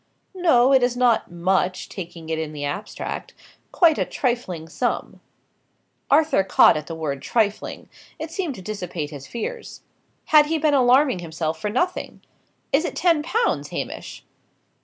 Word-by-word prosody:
"No, 275 -9 +4
it 265 - +6
is 245 0 +1
not 245 -2 +2
much, 185 +1 0
taking 170 -3 -8
it 160 0 -1
in 155 -1 -4
the 145 -1 -4
abstract. 195 +9 -5 0.4
Quite 330 -4 +4
a - - +3
trifling 235 - -2
sum." 155 -1 -3 0.9
Arthur 300 -7 +4
caught 190 - +5
at 155 0 -4
the 165 - -5
word 145 -4 -3
"trifling;" 210 - -1 0.3
it 315 0 -6
seemed 330 -5 -3
to 190 - -10
dissipate 180 -7 -5
his 140 -2 -9
fears. 465 - -6 0.5
Had 300 -1 +6
he 325 +1 0
been 305 -1 +2
alarming 260 -3 +4
himself 160 -1 -4
for 210 - -1
nothing! 355 - -2 0.5
"Is 285 +4 +4
it - - -4
ten 335 -3 +3
pounds, 450 +9 0
Hamish?" - - -6
225 Hz, 155 wpm, -23 LUFS, -, 0.9 s, it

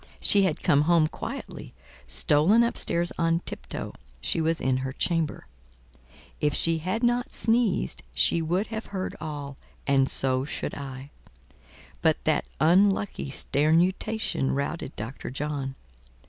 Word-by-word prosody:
She 200 - +5
had 185 -6 0
come 145 - +4
home 170 -2 +5
quietly, 155 - -7 0.3
stolen 150 - +4
up 235 - 0
stairs 170 +1 +3
on 165 0 +2
tip - - -7
toe; - - -5 0.3
she 165 - 0
was 165 +1 +1
in 130 -1 +1
her 130 0 -3
chamber. 165 0 -1 0.9
If 150 -1 +1
she 165 -1 +2
had 185 +8 -2
not 240 0 +1
sneezed, 225 - +1
she 170 - +3
would 180 +6 -1
have 220 0 -5
heard 190 -2 -4
all, 145 -3 -6 0.3
and 135 -1 +3
so 130 -1 +1
should 145 - -4
I; 135 0 -8 0.9
but - - +3
that - - +1
unlucky 190 +1 +2
sternutation 165 +4 +1
routed 140 +1 -3
Dr. 115 +6 -6
John. 135 0 -4
160 Hz, 135 wpm, -26 LUFS, 140-185 Hz, 0.9 s, She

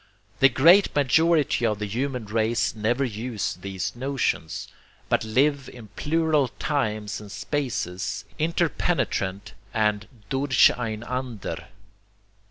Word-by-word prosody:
The 135 - +7
great 170 +10 +5
majority 150 +1 +3
of 110 -2 +1
the 105 - -3
human 125 +3 -3
race 110 +2 0
never 115 +5 0
use 115 -1 -3
these 95 +1 -4
notions, 125 - -2 0.4
but - - +2
live 135 +5 +1
in 115 -4 -12
plural 155 +4 +1
times 110 -8 -2
and 105 -1 -11
spaces, 110 - -3
interpenetrant 150 - -1 0.2
and 105 -1 +1 0.2
DURCHEINANDER. 120 - 0
120 Hz, 100 wpm, -25 LUFS, 105-140 Hz, 0.4 s, The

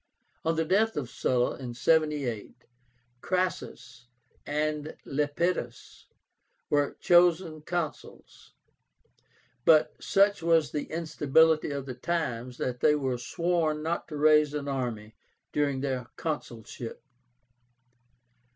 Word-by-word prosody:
On 165 0 +1
the 160 0 0
death 215 +6 +2
of 130 -5 -3
Sulla, 125 -1 0
in 125 -3 -7
78, 150 -6 0 0.7
CRASSUS 180 -9 -3 0.4
and 150 +1 -2
LEPIDUS 145 -2 -2 0.6
were 145 -1 +1
chosen 175 -2 +3
Consuls; 165 -1 -6 1.1
but 155 +1 +5
such 200 0 +3
was 165 -3 +3
the 150 - -2
instability 160 -1 +2
of 140 -2 -4
the 130 - -5
times 125 -4 -3
that 125 -1 -3
they 150 - +4
were 130 -4 -1
sworn 160 +3 -1
not 165 +2 -2
to 150 - -6
raise 150 0 +4
an 145 -1 -3
army 120 -6 -3 0.4
during 140 -3 0
their 130 -3 -2
consulship. 120 -7 -6
150 Hz, 105 wpm, -28 LUFS, 130-165 Hz, 1.1 s, but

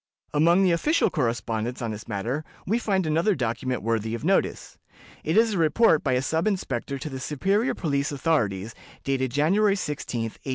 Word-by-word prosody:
Among 170 +5 +4
the 185 - +4
official 295 - +2
correspondence 115 -3 -2
on 115 -2 -3
this 105 0 -8
matter 115 +8 -3 0.2
we 225 +5 +1
find 195 -6 0
another 165 +6 +2
document 125 -1 -2
worthy 115 0 -1
of 115 - -6
notice. 195 +2 0 0.4
It - - 0
is 225 -1 +4
a 190 - -1
report 165 +1 +4
by 130 - +1
a 125 +1 +1
sub 160 +7 0
inspector 140 - -2
to 135 - -6
the 135 -3 -6
superior 195 - 0
police 140 -4 -1
authorities, 115 - 0 0.3
dated 130 -1 0
January 195 - +2
16, 150 - -3
1810. 115 +4 -6
145 Hz, 175 wpm, -25 LUFS, 120-180 Hz, 0.4 s, Among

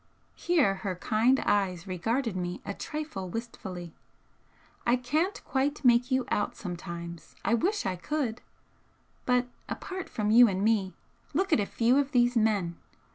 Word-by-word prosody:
Here 315 - +2
her 190 -3 -2
kind 230 +8 +2
eyes 185 -4 +1
regarded 225 +5 -1
me 180 -1 -3
a 200 - -3
trifle 295 - -5
wistfully. 185 -6 -6 0.9
"I 240 - +4
can't 305 +10 0
quite 285 +1 -1
make 245 +1 +5
you 260 -1 +1
out 205 - 0
sometimes, 170 -2 -7
I 225 - +2
wish 390 - +1
I 185 - -1
could! 250 - -2 0.9
But 250 0 +3 0.2
apart 375 -1 -5
from 210 -1 -1
you 240 +2 +8
and 195 -1 -1
me 205 -5 +1 0.4
look 380 +1 +2
at - - +5
a 200 - 0
few 245 +4 +3
of 285 0 -1
these 245 0 +4
men! 205 -7 +1
225 Hz, 150 wpm, -29 LUFS, 190-265 Hz, 0.9 s, you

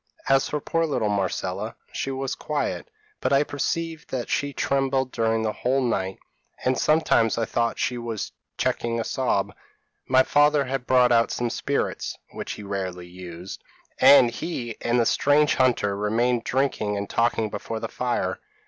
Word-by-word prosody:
As 135 0 +3
for 150 - -1
poor 165 +3 0
little 125 -8 0
Marcella, 100 +1 -2 0.2
she - - -3
was 135 0 -2
quiet, 150 - -3 0.3
but - - -1
I 140 +1 +5
perceived 160 +2 -3
that 125 -3 -3
she 145 0 0
trembled 135 -1 0
during 115 0 +1
the 110 - 0
whole 130 +2 0
night, 95 -6 -1 0.5
and 130 +1 +3
sometimes 150 -7 +3
I 115 - +1
thought 115 +1 0
that - - -13
she 125 -1 -1
was 115 -8 -4 0.3
checking 120 -2 -1
a - - 0
sob. 105 -6 0 0.5
My 130 0 +5
father 145 0 +3
had 130 -1 -3
brought 125 -1 +5
out 115 -1 +4
some 120 -1 -2
spirits, - - -2
which - - -5
he 105 - -9
rarely 95 -3 -4
used, 90 0 -9 0.4
and 125 -4 +7
he 120 -5 -4
and 120 +1 +1
the 115 - +3
strange 145 +4 +3
hunter 120 -6 +2
remained 115 +4 +1
drinking 125 -6 0
and 100 0 -3
talking 115 -1 +1
before 110 +2 -4
the - - -3
fire. 120 -7 -2
120 Hz, 165 wpm, -25 LUFS, 105-135 Hz, 0.5 s, and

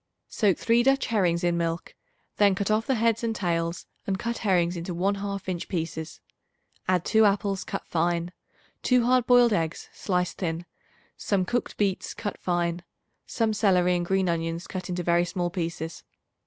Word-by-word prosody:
Soak 200 -6 +2
3 235 +1 +3
Dutch 270 +2 +3
herrings 180 -6 +1
in 175 -1 +2
milk; 165 0 -2 0.4
then 200 -2 +5
cut 200 +2 -1
off 215 +1 +1
the 265 - +2
heads 230 0 +1
and 225 -1 -1
tails 170 -2 -1 0.2
and 195 -1 0
cut 235 +3 -3
herrings 180 -4 +2
into 170 +1 -4
one 190 +4 +1
half 200 -1 -4
inch 180 -2 -3
pieces. 160 -3 -4 0.7
Add 180 -2 +2
2 220 0 +4
apples 200 -1 +1
cut - - -5
fine, 170 +1 0 0.5
2 250 -2 +3
hard 250 0 +3
boiled 245 -2 +6
eggs 165 -4 -2
sliced 180 -2 -1
thin, 170 -1 -2 0.5
some 195 -3 0
cooked 240 +5 -2
beets 195 -3 -1
cut 205 - -5
fine, 175 -1 -1 0.5
some 225 -2 0
celery 180 -4 +3
and 175 - 0
green 190 +1 +1
onions 165 0 -2
cut 185 -1 -6
into 180 0 -2
very 170 0 +3
small 175 0 -2
pieces. 165 -2 -4
185 Hz, 170 wpm, -26 LUFS, 170-210 Hz, 0.7 s, boiled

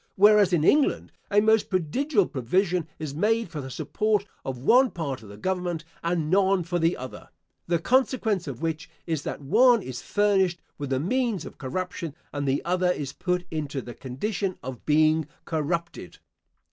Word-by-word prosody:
Whereas 205 -1 +6
in 170 -4 +2
England, 290 - +3 0.2
a 205 - +4
most 220 0 +3
prodigal 200 - +1
provision 170 - 0
is 155 -3 -5
made 215 +6 +1
for 155 -3 -5
the 130 - -7
support 210 +8 0 0.2
of 130 -1 -4
one 245 - +5
part 145 - -4
of 110 - -13
the 100 - -11
Government, 175 - -2 0.2
and 170 -2 0
none 190 -1 +3
for 175 +1 -2
the 165 +1 +2
other, 130 0 -9 0.4
the 170 - +2
consequence 225 - +1
of 140 +2 -6
which 160 -1 -2 0.2
is 160 -4 -1
that - - -4
the - - -12
one 235 - +5
is 125 -2 -6
furnished 195 -4 +2 0.2
with 145 -2 -4
the 130 -1 +1
means 230 - 0
of - - -11
corruption 165 +2 -4 0.2
and 145 -1 -2
the 135 +1 0
other 180 +1 +1
is 140 -6 -4
put 180 -1 -1
into 150 -3 -3
the 120 -2 -8
condition 185 - -3
of 125 -2 -8
being 155 0 +3 0.2
corrupted. 165 +2 -3
175 Hz, 175 wpm, -26 LUFS, 145-200 Hz, 0.4 s, Whereas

